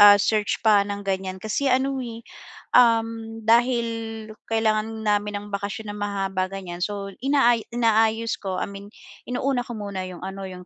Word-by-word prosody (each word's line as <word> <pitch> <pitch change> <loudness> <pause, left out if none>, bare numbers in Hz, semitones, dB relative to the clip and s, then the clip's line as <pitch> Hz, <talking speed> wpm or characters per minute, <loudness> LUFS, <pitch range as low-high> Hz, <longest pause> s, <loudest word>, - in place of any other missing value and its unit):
ah, 205 0 +10
search 210 0 +1
pa 210 -2 +6
ng 200 0 -5
ganiyan 190 -1 -2
kasi 220 +6 0
ano, 265 +1 +1
eh, 230 -2 -6 0.6
um, 225 -2 +3
dahil 235 +1 +3 0.6
kailangan 220 0 0
namin 210 0 +1
ng 205 - -10
bakasyon 200 +2 -4
na - - -8
mahahaba 195 -2 -2
ganiyan, 185 -3 -6
so 200 -1 -3 0.2
inaa 270 -4 +4
inaayos 225 -1 +2
ko, 190 -2 -3
I - - -2
mean 200 0 -9 0.4
inuna 250 0 0
ko 240 - -7
muna 200 -3 -4
'yung 180 -1 -9
ano, 195 +1 -6
'yung 180 -1 -9
215 Hz, 165 wpm, -24 LUFS, 200-230 Hz, 0.6 s, ah